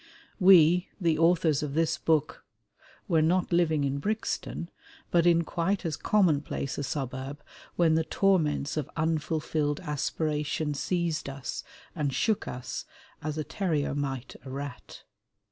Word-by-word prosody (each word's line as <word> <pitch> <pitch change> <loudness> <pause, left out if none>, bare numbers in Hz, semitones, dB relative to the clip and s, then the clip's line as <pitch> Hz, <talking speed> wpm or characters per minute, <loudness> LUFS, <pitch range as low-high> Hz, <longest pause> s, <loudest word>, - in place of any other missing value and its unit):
We 180 -2 +6
the 165 -4 +1
authors 165 -3 +3
of 145 -2 -4
this 165 0 +1
book 155 -2 0 0.6
were 165 -4 +3
not 175 +3 +2
living 160 -4 +3
in 140 0 -1
Brixton, 210 -2 -3 0.4
but 170 0 +4
in 170 -1 +5
quite 175 +4 -1
as 160 -3 -1
commonplace 155 -9 +1
a - - -2
suburb 135 +1 -4 0.3
when 165 -2 +4
the 160 0 +3
torments 160 -6 +1
of 150 - -2
unfulfilled 155 -1 0
aspiration 150 0 -1
seized 165 0 -1
us 135 -1 -5 0.3
and 150 -5 -1
shook 215 - 0
us, 125 0 -5 0.4
as 155 0 -3
a 155 - -1
terrier 155 -6 -1
might 135 -3 -3
a 135 - -9
rat. 140 -1 -7
155 Hz, 135 wpm, -28 LUFS, 145-170 Hz, 0.6 s, We